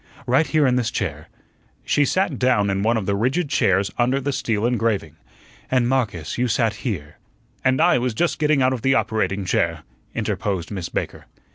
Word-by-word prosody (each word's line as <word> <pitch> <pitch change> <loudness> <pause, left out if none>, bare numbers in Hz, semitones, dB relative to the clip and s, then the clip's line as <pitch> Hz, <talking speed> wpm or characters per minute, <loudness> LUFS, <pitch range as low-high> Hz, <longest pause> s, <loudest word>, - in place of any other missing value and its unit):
"Right 135 +6 +3
here 155 -2 +2
in 125 -1 +3
this 120 -2 0
chair." 80 -9 -4 0.6
She 145 - +2
sat 180 -5 0
down 105 -6 +2
in 95 0 -1
one 115 +3 +2
of 105 - -2
the 100 +1 0
rigid 130 - 0
chairs 95 -5 +2
under 125 +3 +2
the 140 +1 -2
steel 110 -3 -1
engraving. 115 -10 0 0.5
"And, 125 -2 +2
Marcus, 115 - -1
you 125 - +2
sat 115 -1 0
here 80 - -5 0.2
" - - -38
"And 130 0 +2
I 125 - +4
was 120 -2 -2
just 175 +8 0
getting 150 -3 +3
out 130 +1 +3
of 125 - -4
the 135 +2 +3
operating 105 -5 0
chair," 85 -3 0 0.3
interposed 95 -4 -2
Miss 95 -4 -4
Baker. - - -4
115 Hz, 190 wpm, -22 LUFS, 100-130 Hz, 0.6 s, I